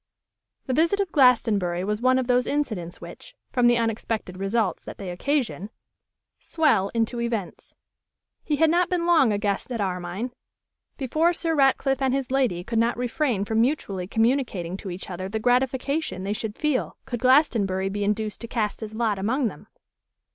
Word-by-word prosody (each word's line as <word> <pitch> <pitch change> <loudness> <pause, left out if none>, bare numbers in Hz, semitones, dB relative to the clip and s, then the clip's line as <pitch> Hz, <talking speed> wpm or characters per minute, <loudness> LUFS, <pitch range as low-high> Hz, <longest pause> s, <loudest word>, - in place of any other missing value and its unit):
The 260 - -1
visit 335 +8 +2
of 390 -4 -1
Glastonbury 215 - +3
was 210 +3 -2
one 255 +1 +4
of 260 - 0
those 250 0 +2
incidents 215 - -3
which, - - -11 0.2
from 245 -1 +4
the 240 0 +4
unexpected 225 -4 -2
results 195 +1 -1
that - - -9
they 190 -3 -6
occasion, 225 -1 -1 0.7
swell 225 - +2
into 230 +1 0
events. 230 -6 -4 0.7
He 300 - 0
had 315 +1 +3
not 350 +1 +2
been 350 -2 0
long 320 -9 +4
a 205 - +1
guest 205 +3 -2
at 235 - -2
Armine 185 +4 -3 0.7
before 310 +6 +1
Sir 330 -1 -1
Ratcliffe 270 -2 +2
and 265 -1 +2
his 270 -2 -3
lady 250 -11 +1
could 230 +3 -1
not 230 +1 +1
refrain 245 -4 0
from 220 +1 +1
mutually 205 -9 -1
communicating 225 -6 0
to 195 - -7
each 180 +1 -7
other 185 +1 -5
the 220 - -2
gratification 255 - 0
they 200 +2 -1
should 215 0 -4
feel 300 -4 -1
could 245 -3 -4
Glastonbury 225 -8 +3
be 205 +1 -2
induced 210 +1 -2
to 230 - -6
cast 220 -3 -2
his 220 0 -6
lot 220 -3 0
among 235 +5 0
them. 150 - -13
230 Hz, 175 wpm, -25 LUFS, 200-270 Hz, 0.7 s, one